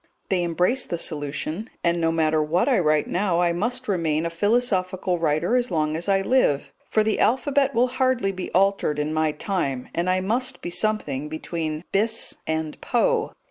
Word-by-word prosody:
They 185 -3 +1
embraced 180 +10 0
the 170 - -1
solution, 155 - -4
and, 170 0 +1
no 165 0 +2
matter 160 -1 +2
what 160 +4 +1
I - - +3
write 155 -3 +2
now, 180 -2 0
I 175 -1 +2
must 245 +8 -2
remain 165 -5 0
a 170 - -2
philosophical 185 -2 +1
writer 165 +7 +1
as 250 -1 +1
long 155 -3 0
as 170 +5 -3
I 195 0 +3
live, 145 - +1 0.2
for 215 - +3
the 215 0 0
alphabet 275 +1 +2
will 245 +2 +3
hardly 255 -5 +1
be 185 -1 -6
altered 195 -5 +2
in 150 +1 -1
my 155 0 +1
time, 150 -6 -3
and 175 +2 0
I 185 0 +2
must 250 +7 -1
be 175 - -4
something 150 -9 -1
between 155 0 -4
"Bis" 220 +3 0
and 160 -1 -3
"Poe." 485 -2 +1
180 Hz, 180 wpm, -24 LUFS, 155-215 Hz, 0.2 s, I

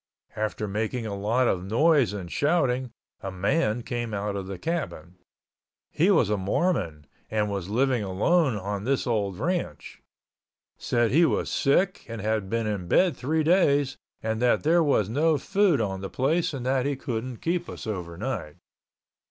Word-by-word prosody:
After 110 0 -2
making 110 +4 -2
a 105 - -4
lot 115 +6 +1
of 90 -4 0
noise 130 - +3
and 95 -4 -6
shouting, 130 -5 +1 0.3
a 95 - -5
man 110 - 0
came 120 -3 -3
out 100 0 -2
of 95 -1 -4
the 95 -1 -5
cabin. 140 - -4 0.7
He 170 +6 +2
was 120 - +3
a 105 - +2
Mormon 95 - -1 0.2
and 105 -1 0
was 100 -2 -4
living 125 +2 +1
alone 120 - +2
on 100 +1 -4
this 135 +3 0
old 105 -6 -1
ranch. 170 - -3 0.7
Said 120 -2 0
he 160 +7 +5
was - - -1
sick 185 +8 +1
and 115 -1 -6
had 105 -2 -1
been 115 +1 -1
in 100 -4 -3
bed 175 - +3
three 155 +6 0
days 145 -5 +3 0.3
and 110 +1 -2
that 125 -1 +3
there 170 +3 +4
was 140 - +2
no 150 +7 +2
food 195 0 +2
on 95 -3 -2
the 95 - -5
place 155 +6 0
and 135 -4 -5
that 130 +1 +1
he 145 - 0
couldn't 125 -2 -4
keep 175 +4 -2
us - - -8
overnight. 90 - -4
120 Hz, 170 wpm, -26 LUFS, 100-145 Hz, 0.7 s, he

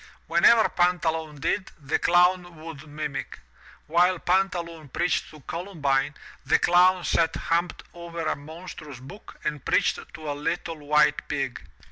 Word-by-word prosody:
Whatever 195 +7 +5
Pantaloon 160 -4 0
did, 185 +7 -1
the 145 0 -1
Clown 175 0 +3
would 155 -2 -9
mimic. 145 -1 -5 0.5
While 175 +3 +3
Pantaloon 170 -4 -1
preached 175 +6 0
to 155 -1 -14
Columbine, 150 -5 -1 0.3
the - - +4
Clown 180 +1 +4
sat 165 -1 +1
humped 170 +2 -1
over 170 -1 -7
a 155 - +1
monstrous 150 -2 -10
book 140 +12 -12
and 150 -3 -3
preached - - +2 0.2
to 155 -2 -5
a - - -1
little 160 +2 -3
white 150 0 +2
pig. 135 -4 -3
165 Hz, 135 wpm, -26 LUFS, 150-175 Hz, 0.5 s, Whatever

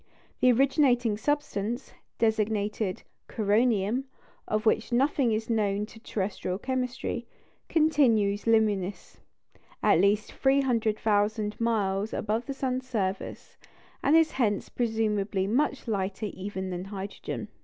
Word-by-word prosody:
The 255 - +5
originating 250 -3 +3
substance, 240 -2 -2 0.2
designated 215 -3 0 0.3
"coronium," 220 +2 +1 0.4
of 215 +1 -1
which 220 +2 +2
nothing 260 0 +2
is 220 +1 -1
known 210 -3 0
to 225 - -14
terrestrial 195 -4 -3
chemistry, 255 +1 -3 0.4
continues 235 -11 +3
luminous 210 -4 +1 0.6
at - - +5
least 205 +1 +2
300,000 220 -5 +1
miles 210 -3 0
above 220 +3 -1
the 275 - -2
sun's 260 -1 -2
surface, 195 -5 -3 0.4
and 290 - +4
is 325 -1 +5
hence 215 -6 0
presumably 215 -4 0
much 260 +5 0
lighter 200 0 -2
even 190 -1 -5
than 180 +1 -4
hydrogen. 195 0 -6
220 Hz, 110 wpm, -28 LUFS, 205-250 Hz, 0.6 s, The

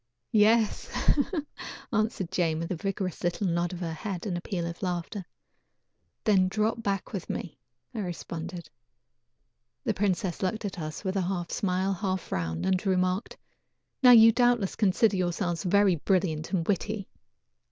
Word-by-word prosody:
"Yes," 220 0 +3 1.0
answered 215 -5 0
Jane, 170 -4 +1
with 165 +2 -4
a - - 0
vigorous 190 +1 -3
little 175 +3 0
nod 170 -1 0
of 180 -1 -6
her 165 -2 -2
head, 180 +3 -5
and 190 -4 -2
a 175 - -3
peal 175 -2 -3
of 170 0 -6
laughter. 180 +2 -3 1.0
"Then 190 -4 +4
drop 215 +4 0
back 195 -3 -2
with 190 -4 -5
me," 170 - -5 0.3
I - - -4
responded. 175 -2 -5 1.2
The - - +1
princess 190 -2 -1
looked 210 +3 -1
at 190 -3 -4
us 155 +2 -5
with 190 0 -1
a - - +2
half 175 -2 -2
smile, 190 0 0
half 190 0 -1
frown, 80 -2 -3
and 185 -1 +1
remarked: 185 +1 0 0.6
"Now 255 - +8
you 225 -2 +9
doubtless 240 -4 +2
consider 205 0 +3
yourselves 175 -1 -1
very 195 -1 +3
brilliant 165 -2 0
and 175 -4 0
witty." 205 0 -1
185 Hz, 150 wpm, -28 LUFS, 175-205 Hz, 1.2 s, you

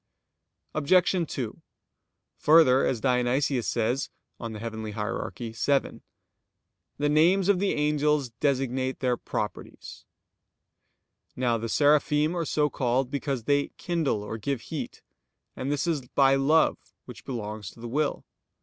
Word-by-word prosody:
Obj. 170 +4 +3 0.2
2: 120 -5 -5 0.8
Further, 150 -4 +6
as 120 -4 -1
Dionysius 125 0 +1
says 120 +4 0 0.3
(Coel. 115 -2 -5
Hier. 110 -1 -4
vii): 120 +4 -1 1.0
"The 145 - 0
names 170 +6 +4
of 200 -3 +3
the 200 0 +1
angels 150 -2 +1
designate 130 -1 0
their 125 -2 +1
properties." - - -6 1.3
Now 120 -2 0
the 115 +1 -4
Seraphim 150 +3 +3
are 170 -2 -1
so 150 0 +1
called 130 -1 -1
because 140 -4 -2
they 145 +3 +2
"kindle" 160 -12 -1
or 110 +2 -6
"give 135 +3 -2
heat": - - -6 0.5
and 135 +2 -3
this 145 +2 0
is 165 -5 0
by 135 +1 +4
love 145 +4 +3 0.3
which - - -11
belongs 105 -5 -5
to - - -17
the 120 - -6
will. 145 +4 -1
135 Hz, 125 wpm, -27 LUFS, 120-150 Hz, 1.3 s, Further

